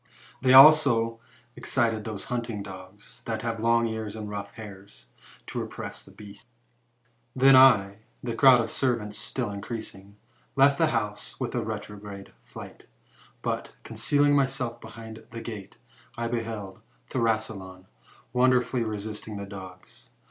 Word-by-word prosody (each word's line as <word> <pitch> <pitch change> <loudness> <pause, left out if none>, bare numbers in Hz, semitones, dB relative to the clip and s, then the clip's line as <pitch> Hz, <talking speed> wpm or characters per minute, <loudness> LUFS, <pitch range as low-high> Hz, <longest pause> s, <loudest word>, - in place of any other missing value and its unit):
They 130 - +3
also 130 -5 +7 0.4
excited 115 -5 0
those 110 -3 -5
hunting 115 -4 -3
dogs, 95 +3 -12
that 110 -1 -3
have 115 -1 -2
long 115 +1 +3
ears 110 -2 -4
and 110 -1 -6
rough 100 0 -6
hairs, 100 - -12 0.4
to - - -5
repress - - -7
the - - -16
beast 100 +2 -13 0.9
Then 135 +1 +6
I, 105 -7 +6 0.2
the 120 -2 -3
crowd 125 +1 +6
of 115 - -4
servants 115 -6 -1
still 120 -5 -3
increasing, 100 -1 -7 0.4
left 140 +1 +5
the - - +4
house - - -3
with - - -3
a - - 0
retrograde 100 -1 -7
flight; - - -12 0.6
but, - - -3
concealing 145 0 +2
myself 135 -4 -1
behind 110 0 -10
the 115 - -7
gate, 110 -4 -8 0.4
I 115 0 -2
be 115 0 -1
held 105 -4 -7 0.3
Thrasyleon 110 -6 -2 0.5
wonderfully 125 -1 +2
resisting 105 0 -5
the 100 - -5
dogs. 95 -2 -12
110 Hz, 135 wpm, -27 LUFS, 100-120 Hz, 0.9 s, also